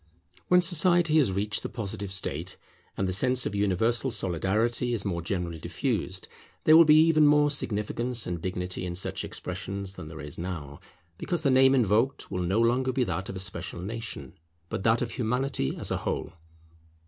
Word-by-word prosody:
When 180 0 +5
society 175 -2 +3
has 130 -10 +2
reached 105 +2 -1
the - - -5
Positive 100 -3 -5
state, 90 -2 -3 0.4
and 95 - 0
the 95 - -1
sense 125 +6 +2
of - - -2
universal 105 +5 +1
solidarity 110 +5 0
is 105 - -3
more 85 -4 -2
generally 85 -2 -3
diffused, - - -3 0.4
there 155 - +7
will 165 +1 +9
be 150 0 +6
even 155 -2 +5
more 145 0 +4
significance 120 -1 -1
and 85 -2 -4
dignity 90 0 -3
in 90 -1 -4
such 95 - -2
expressions 95 +1 -5
than 75 - -8
there 80 0 -9
is 75 +1 -7
now, 80 -5 -6 0.4
because 175 -3 -2
the 140 - +3
name 130 +1 +5
invoked 115 +2 +1
will 90 -1 -2
no 95 +5 +1
longer 125 +3 +2
be 130 0 +1
that 95 -2 -3
of 95 - -5
a - - -5
special 95 -2 -4
nation, 105 - -6 0.4
but - - -3
that 115 +2 +3
of 115 - -4
Humanity 125 - -1
as - - -5
a - - +1
whole. - - -3
105 Hz, 185 wpm, -27 LUFS, 90-130 Hz, 0.4 s, will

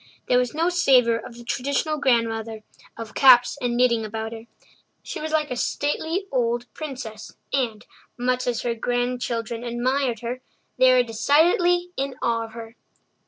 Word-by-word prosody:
There 250 - +4
was 250 +2 -2
no 330 +3 +2
savour 255 -10 +4
of 235 0 -11
the 240 - -11
traditional 280 +5 -1
grandmother 225 -4 0 0.3
of 230 -1 -8
caps 250 -2 +6
and 240 -1 -1
knitting 240 -2 +3
about 220 +1 -5
her. 225 0 -10 0.6
She - - -6
was 310 0 -4
like 305 -3 0
a - - -1
stately 320 +8 -2
old 240 -2 0
princess 255 -8 -8 0.2
and, 235 -6 -1 0.3
much 250 +1 -1
as 240 -2 -1
her 240 - 0
grandchildren 245 -1 -2
admired 245 0 -1
her, 245 +2 -5 0.4
they 255 0 +7
were 250 -1 +5
decidedly 335 +10 +2
in 270 -1 -2
awe 230 -1 0
of 225 - -13
her. 225 0 -9
245 Hz, 160 wpm, -23 LUFS, 230-275 Hz, 0.6 s, they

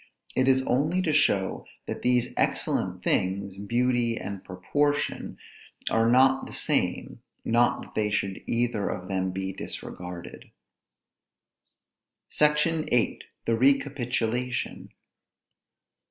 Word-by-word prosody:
It 130 0 +2
is 130 0 +4
only 150 +8 +1
to 160 -4 +1
show 100 -10 +2 0.2
that - - -5
these 125 -1 +2
excellent - - 0
things, 95 +1 0
beauty 120 +2 +1
and 100 -2 -6
proportion, 145 +11 -1 0.5
are 115 +1 +3
not 130 +2 +4
the - - -9
same; - - -1 0.2
not 120 +1 +2
that - - -15
they 105 -1 +1
should 95 -2 -1
either 115 -3 0
of 90 - -5
them 95 -1 0
be 95 +1 -3
disregarded. 90 -2 -7 1.8
SECTION 150 +1 +2
VIII. 120 -2 +1 0.3
THE 115 - +2
RECAPITULATION. 125 -3 0
120 Hz, 110 wpm, -27 LUFS, 100-135 Hz, 1.8 s, is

